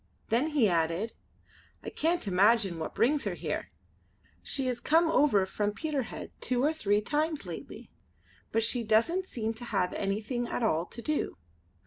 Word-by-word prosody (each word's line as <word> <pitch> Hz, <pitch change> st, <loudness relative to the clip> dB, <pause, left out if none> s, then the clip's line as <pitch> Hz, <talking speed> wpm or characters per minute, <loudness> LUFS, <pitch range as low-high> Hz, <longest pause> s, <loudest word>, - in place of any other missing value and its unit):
Then 240 Hz, +7 st, +2 dB
he 295 Hz, -8 st, +3 dB
added: 170 Hz, +5 st, 0 dB, 0.7 s
"I -, -, -5 dB
can't 335 Hz, -6 st, 0 dB
imagine 195 Hz, -1 st, +3 dB
what 160 Hz, -, -5 dB
brings 285 Hz, +4 st, +2 dB
her -, -, -1 dB
here. -, -, -3 dB, 0.7 s
She 270 Hz, -2 st, -3 dB
has 250 Hz, -2 st, 0 dB
come 325 Hz, +5 st, +3 dB
over 235 Hz, -12 st, +4 dB
from 205 Hz, +2 st, -1 dB
Peterhead 290 Hz, -1 st, -4 dB
two 250 Hz, 0 st, 0 dB
or 305 Hz, +3 st, +3 dB
three 210 Hz, -9 st, +1 dB
times 305 Hz, +6 st, -1 dB
lately; -, -, -8 dB, 0.6 s
but 225 Hz, -, +2 dB
she 235 Hz, +1 st, +2 dB
doesn't 230 Hz, -, +2 dB
seem 225 Hz, -6 st, -2 dB
to 235 Hz, +2 st, -6 dB
have 180 Hz, -6 st, 0 dB
anything 215 Hz, +5 st, -2 dB
at 240 Hz, -, -2 dB
all 170 Hz, -5 st, +1 dB
to 235 Hz, -, -9 dB
do. 305 Hz, -, -1 dB
230 Hz, 160 wpm, -30 LUFS, 205-295 Hz, 0.7 s, over